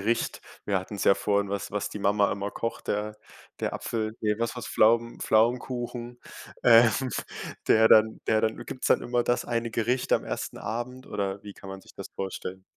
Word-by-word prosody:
Gericht? 115 +4 -1 0.2
Wir 100 -2 +1
hatten 95 +3 -8
es 100 - -2
ja 100 - +6
vorhin, 100 -1 0
was 100 0 -3
was 105 0 -2
die - - -6
Mama 100 0 +2
immer 100 0 -3
kocht, 115 +2 -5
der 105 +1 -2 0.4
der - - -1
Apfel 110 -1 -3
ne, 105 -1 +1
was 115 +1 -1
war's, 120 - -5
Pflaumen 115 +2 +3
Pflaumenkuchen, 120 +1 0 0.4
ähm, 115 -1 +7 0.8
der 110 0 +6
dann 110 0 +5
der 110 -1 +3
dann 110 0 0
gibt's 130 - -5
dann - - +4
immer 120 0 +1
das 120 0 0
eine 115 -1 -2
Gericht 120 +3 0
am - - +3
1. - - -4
Abend 120 +4 -5
oder 100 0 -3
wie 105 - -9
kann 95 - -12
man 95 0 -7
sich - - -18
das - - -8
vorstellen? 95 -1 -5
110 Hz, 195 wpm, -27 LUFS, 100-120 Hz, 0.8 s, ähm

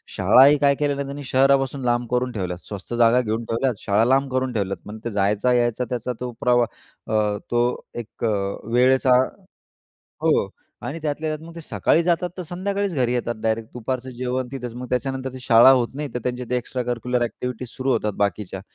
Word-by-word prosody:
शाळाही 140 +3 +6
काय 140 0 +3
केलेलं 140 -1 0
त्यांनी 140 +1 -6
शहरापासून 135 0 +3
लांब 120 0 +1
करून 125 0 0
ठेवल्यात, 90 -5 -3
स्वस्त 100 +2 -7
जागा 120 +1 +4
घेऊन 115 0 -2
ठेवल्यात, 115 0 -1
शाळा 105 +3 +3
लांब 135 +2 +2
करून 130 -1 -1
ठेवल्यात, 100 -2 -3
मग 110 +1 -8
ते 120 - -2
जायचा 105 +4 +1
यायचा 120 0 +1
त्याचा 125 0 -2
तो 125 -1 -4
प्रवाह 120 -1 +4 0.5
अ, 105 -1 +1
तो 120 +1 +1
एक 120 0 -8
अ 110 - +2 0.4
वेळेचा 130 +1 +4 1.1
हो - - +2 0.4
आणि 160 +4 -4
त्यातल्या 155 +1 -2
त्यात 155 +1 -9
मग 170 - -12
ते 165 - -8
सकाळी 165 +1 +1
जातात 175 +1 +1
तर 180 - -4
संध्याकाळीच 190 +2 -2
घरी 125 -3 +1
येतात 120 -1 -1
डायरेक्ट, 110 0 -1
दुपारचं 130 +2 -4
जेवण 125 +1 -3
तिथेच 125 -3 -5
मग 125 0 -7
त्याच्यानंतर 130 0 -2
ती 130 - -8
शाळा 120 +1 +7
होत 125 -3 +4
नाही 150 +1 -4
तर - - 0
त्यांचे 125 0 -3
एक्स्ट्रा 125 +1 -3
करिक्युलर 125 0 -1
ॲक्टिव्हिटीज 125 +1 -4
सुरू 130 0 0
होतात 105 -3 0
बाकीच्या, 100 -2 -2
125 Hz, 185 wpm, -23 LUFS, 115-135 Hz, 1.1 s, शाळा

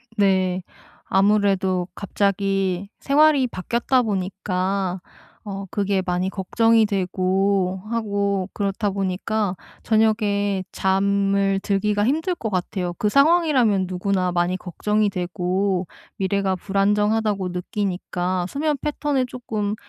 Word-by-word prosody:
네. 190 -3 +2 0.4
아무래도 195 -2 +2
갑자기 195 -1 -1
생활이 285 -2 +4
바뀌었다 235 +6 0
보니까 190 -2 -2 0.4
어 195 -1 -5
그게 200 -1 0
많이 180 +1 0
걱정이 225 +3 +2
되고 190 -1 0
하고 200 -4 -1
그렇다 200 +1 -1
보니까 195 +1 -1 0.3
저녁에 210 -3 +1
잠을 195 0 +1
들기가 205 +1 +1
힘들 320 +7 0
것 220 - -4
같아요. 180 -1 -2
그 210 - 0
상황이라면 275 - +3
누구나 185 0 -1
많이 175 +1 +1
걱정이 210 +4 0
되고 180 0 -1 0.3
미래가 195 0 0
불안정하다고 205 0 +1
느끼니까 180 -1 -2
수면 300 +1 0
패턴에 290 -3 0
쪼끔 215 -4 -3
200 Hz, 260 characters per minute, -22 LUFS, 185-215 Hz, 0.4 s, 생활이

